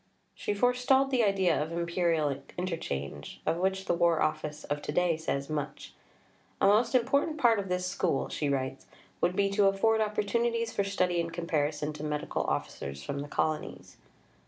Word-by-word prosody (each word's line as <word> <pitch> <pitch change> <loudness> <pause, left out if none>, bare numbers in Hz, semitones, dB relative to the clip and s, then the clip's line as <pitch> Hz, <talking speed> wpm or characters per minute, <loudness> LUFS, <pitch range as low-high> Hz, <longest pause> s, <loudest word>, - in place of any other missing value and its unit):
She 205 - -3
forestalled 250 +4 +3
the 250 -3 +3
idea 190 -6 +2
of 155 +2 -3
Imperial 170 -4 0 0.2
inter 180 -1 -1
change, 70 - -5
of 165 - +1
which 190 +1 0
the - - +1
War 170 -1 +3
Office 155 -1 -1
of 145 0 -3
to - - -4
day 175 +1 +2
says 140 -3 -2
much. 150 -2 -5 0.7
"A - - +3
most 215 +6 +4
important 280 +6 +2
part 235 -7 +4
of 195 -2 -4
this 180 0 0
School," 180 -5 0
she 145 - -2
writes, 130 -1 -2 0.3
would 175 +1 +2
be 200 +1 +3
to 200 0 +4
afford 220 +3 +3
opportunities 230 +2 0
for 200 - +1
study 180 -3 +1
and 165 0 -4
comparison 155 -3 -1
to 150 0 -8
Medical 150 -1 -2
Officers 70 -1 -3
from 140 - -4
the 145 - -5
Colonies. 155 +1 -3
175 Hz, 175 wpm, -30 LUFS, 150-205 Hz, 0.7 s, most